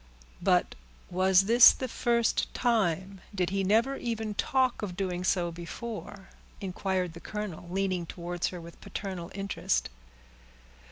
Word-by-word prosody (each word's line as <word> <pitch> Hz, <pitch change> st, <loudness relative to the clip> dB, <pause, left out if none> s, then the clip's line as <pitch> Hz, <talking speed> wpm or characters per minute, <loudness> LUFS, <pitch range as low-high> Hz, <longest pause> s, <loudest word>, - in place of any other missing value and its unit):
"But -, -, +2 dB, 0.4 s
was 185 Hz, +1 st, +5 dB
this 230 Hz, +5 st, +8 dB
the 260 Hz, -, -4 dB
first 235 Hz, -1 st, +1 dB
time? 195 Hz, -5 st, 0 dB
Did 180 Hz, -2 st, 0 dB
he 195 Hz, 0 st, 0 dB
never 230 Hz, +8 st, +2 dB
even 225 Hz, -2 st, -3 dB
talk 260 Hz, +3 st, +1 dB
of 185 Hz, -4 st, -5 dB
doing 180 Hz, -2 st, -2 dB
so 175 Hz, -2 st, +1 dB
before?" 195 Hz, +3 st, -7 dB, 0.3 s
inquired 185 Hz, -2 st, -2 dB
the 170 Hz, -, -9 dB
colonel, 205 Hz, -4 st, -6 dB
leaning 185 Hz, -2 st, -1 dB
towards 175 Hz, 0 st, -3 dB
her 180 Hz, -, -6 dB
with 170 Hz, 0 st, -12 dB
paternal 185 Hz, -4 st, -5 dB
interest. 195 Hz, -, -1 dB
190 Hz, 130 wpm, -29 LUFS, 175-215 Hz, 0.4 s, this